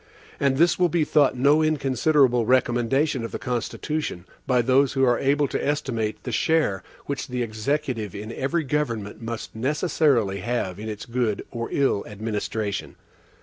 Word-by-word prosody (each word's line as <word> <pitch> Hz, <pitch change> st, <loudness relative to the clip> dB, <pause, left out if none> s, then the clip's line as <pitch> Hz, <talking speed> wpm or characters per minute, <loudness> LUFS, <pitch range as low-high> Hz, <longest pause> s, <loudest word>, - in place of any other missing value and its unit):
And 135 Hz, -1 st, +2 dB
this 170 Hz, +4 st, +3 dB
will 180 Hz, -1 st, +4 dB
be 170 Hz, -1 st, +2 dB
thought 145 Hz, -4 st, +3 dB
no 145 Hz, +4 st, +4 dB
inconsiderable 135 Hz, -4 st, +2 dB
recommendation 130 Hz, +2 st, +2 dB
of 115 Hz, -, -5 dB
the -, -, -3 dB
Constitution, 125 Hz, -, -3 dB, 0.2 s
by 125 Hz, -2 st, +3 dB
those 130 Hz, +2 st, +3 dB
who 135 Hz, -1 st, +1 dB
are 120 Hz, -2 st, +3 dB
able 145 Hz, +1 st, +2 dB
to -, -, -2 dB
estimate 120 Hz, -7 st, -2 dB
the -, -, -4 dB
share 155 Hz, -, +1 dB, 0.2 s
which 140 Hz, -1 st, -4 dB
the 125 Hz, -1 st, -2 dB
executive 115 Hz, -1 st, -2 dB
in 105 Hz, +2 st, -6 dB
every 160 Hz, +7 st, -1 dB
government 120 Hz, -9 st, -2 dB
must 115 Hz, -1 st, -6 dB
necessarily 130 Hz, -, +1 dB
have 100 Hz, -3 st, -2 dB
in 110 Hz, +1 st, -5 dB
its 105 Hz, -1 st, -6 dB
good 115 Hz, -3 st, -1 dB
or 115 Hz, -1 st, -4 dB
ill 135 Hz, -8 st, +1 dB
administration. 105 Hz, 0 st, -3 dB
125 Hz, 155 wpm, -24 LUFS, 110-145 Hz, 0.2 s, will